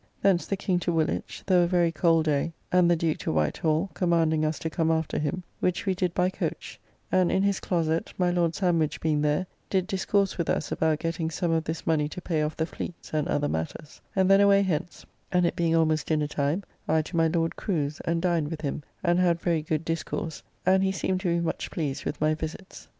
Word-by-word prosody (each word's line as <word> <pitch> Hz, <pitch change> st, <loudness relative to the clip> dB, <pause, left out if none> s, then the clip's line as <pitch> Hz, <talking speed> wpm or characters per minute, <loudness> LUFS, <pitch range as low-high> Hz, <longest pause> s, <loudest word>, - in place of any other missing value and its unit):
Thence 190 Hz, -3 st, +3 dB
the 195 Hz, -, -1 dB
King 185 Hz, -1 st, 0 dB
to 175 Hz, -, -1 dB
Woolwich, 160 Hz, -2 st, -1 dB
though 185 Hz, -2 st, +4 dB
a 175 Hz, -, +3 dB
very 175 Hz, -2 st, +2 dB
cold 165 Hz, 0 st, +3 dB
day; 150 Hz, +2 st, 0 dB, 0.2 s
and 180 Hz, -1 st, +5 dB
the 175 Hz, -, +5 dB
Duke 160 Hz, -1 st, -1 dB
to -, -, -2 dB
White 75 Hz, -1 st, +1 dB
Hall, 160 Hz, +4 st, 0 dB
commanding 165 Hz, -3 st, +2 dB
us 155 Hz, 0 st, 0 dB
to 160 Hz, -, -3 dB
come 165 Hz, -1 st, +1 dB
after 160 Hz, -1 st, 0 dB
him, 150 Hz, +5 st, -2 dB, 0.2 s
which 180 Hz, +2 st, 0 dB
we 190 Hz, -, +2 dB
did 180 Hz, -1 st, -1 dB
by 180 Hz, +1 st, +2 dB
coach; -, -, -4 dB, 0.3 s
and 185 Hz, -2 st, +3 dB
in 190 Hz, -, +2 dB
his 200 Hz, -1 st, +1 dB
closett, 165 Hz, -2 st, -1 dB
my 180 Hz, -1 st, +2 dB
Lord 170 Hz, -2 st, +1 dB
Sandwich 170 Hz, -5 st, +1 dB
being 155 Hz, -2 st, +1 dB
there, 150 Hz, +5 st, +1 dB, 0.2 s
did 190 Hz, -2 st, +1 dB
discourse 195 Hz, 0 st, 0 dB
with 170 Hz, -, -1 dB
us -, -, -1 dB
about 160 Hz, -1 st, +1 dB
getting 165 Hz, 0 st, -2 dB
some 165 Hz, +1 st, -1 dB
of 165 Hz, -1 st, +1 dB
this 160 Hz, +1 st, -4 dB
money 150 Hz, -2 st, +1 dB
to 165 Hz, -, -7 dB
pay 165 Hz, -3 st, -1 dB
off 150 Hz, +1 st, -2 dB
the 160 Hz, -, +1 dB
Fleets, 170 Hz, 0 st, -8 dB
and 155 Hz, -1 st, 0 dB
other 145 Hz, 0 st, 0 dB
matters; 80 Hz, -, -5 dB
and 190 Hz, -1 st, +3 dB
then 195 Hz, +1 st, +6 dB
away 200 Hz, 0 st, +5 dB
hence, 175 Hz, -2 st, -3 dB, 0.3 s
and, 180 Hz, -1 st, +3 dB
it -, -, 0 dB
being 165 Hz, -1 st, +1 dB
almost 160 Hz, -1 st, +2 dB
dinner 155 Hz, -2 st, +1 dB
time, 145 Hz, +5 st, -1 dB, 0.2 s
I 160 Hz, 0 st, +2 dB
to 170 Hz, -, -8 dB
my 165 Hz, -1 st, +4 dB
Lord 165 Hz, 0 st, 0 dB
Crew's, 155 Hz, -7 st, -2 dB
and 165 Hz, +1 st, -1 dB
dined 170 Hz, -5 st, +1 dB
with 160 Hz, -2 st, -5 dB
him, 145 Hz, 0 st, -3 dB, 0.2 s
and 175 Hz, 0 st, +3 dB
had 175 Hz, -2 st, +3 dB
very 170 Hz, -2 st, +1 dB
good 155 Hz, +1 st, -2 dB
discourse, 165 Hz, 0 st, -3 dB, 0.2 s
and 190 Hz, +1 st, +4 dB
he 190 Hz, 0 st, +2 dB
seemed 190 Hz, -1 st, -1 dB
to 190 Hz, -, -3 dB
be 170 Hz, -, +2 dB
much 170 Hz, -1 st, -2 dB
pleased 145 Hz, -4 st, -3 dB
with -, -, -3 dB
my 155 Hz, +1 st, +2 dB
visits. 160 Hz, +4 st, -7 dB
165 Hz, 230 wpm, -27 LUFS, 155-180 Hz, 0.3 s, then